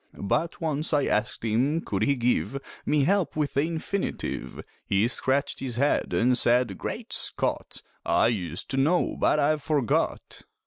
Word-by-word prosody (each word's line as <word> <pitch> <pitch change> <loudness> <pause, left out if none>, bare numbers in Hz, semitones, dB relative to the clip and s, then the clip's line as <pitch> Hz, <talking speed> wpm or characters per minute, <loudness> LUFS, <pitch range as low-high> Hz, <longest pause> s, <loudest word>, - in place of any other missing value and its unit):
But 165 - -1
once 155 -1 -1
I 145 -2 +3
asked 105 +1 -1
him 130 +9 +1
could 100 -9 -3
he 140 +5 +3
give 125 +2 0 0.3
Me 150 -2 +3
help 195 +3 +1
with 150 -2 -1
the 140 - +2
infinitive 165 +5 -3 0.2
He 100 +3 +2
scratched 130 +3 0
his 130 -3 -3
head 140 +4 +1
and 125 +2 +3
said: 120 -5 +2
"Great - - -5
Scott! - - -2 0.2
I - - +3
used 90 -7 -3
to 135 - -1
know, 160 +7 +2
but - - +3
I've 150 +1 +2
forgot." 145 -5 -1
135 Hz, 155 wpm, -26 LUFS, 115-150 Hz, 0.3 s, I